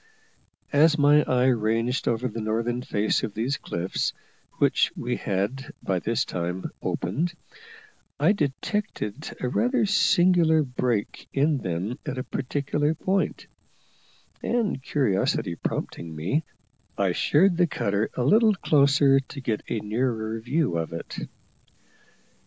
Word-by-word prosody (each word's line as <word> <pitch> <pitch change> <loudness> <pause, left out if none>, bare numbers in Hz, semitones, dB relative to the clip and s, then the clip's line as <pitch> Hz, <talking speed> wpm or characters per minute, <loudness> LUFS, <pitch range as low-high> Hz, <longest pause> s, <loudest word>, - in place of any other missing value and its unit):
As 155 +2 +5
my 145 +1 +6
eye 125 0 +2
ranged 115 +2 0
over 120 +2 +1
the 115 -1 -5
northern 115 +3 -1
face 105 -3 0
of 105 - -4
these 125 +6 -1
cliffs, 85 +2 -2 0.4
which - - +3
we - - -2
had 100 +8 -2
by 95 -2 0
this 115 +5 0
time 90 +1 -4
opened, 160 - -2 0.8
I - - +5
detected 150 - -3
a 125 - -1
rather 245 - +1
singular 175 -5 +4
break 125 -5 -2
in 145 +1 +2
them 95 +4 -3
at 150 -4 -4
a 130 - -2
particular 145 +3 -1
point; 190 +4 -1 1.0
and, 225 - 0
curiosity 115 - 0
prompting 80 0 -4
me, 115 - -1 0.5
I 100 -2 +2
sheered 170 - +3
the 175 -1 +4
cutter 100 -7 -1
a 125 - 0
little 215 - +5
closer 140 -4 +4
to 135 +2 -9
get 115 -5 -2
a 115 - -1
nearer 110 0 -1
view 125 - 0
of 80 0 -4
it. 85 - -6
130 Hz, 130 wpm, -25 LUFS, 110-155 Hz, 1.0 s, my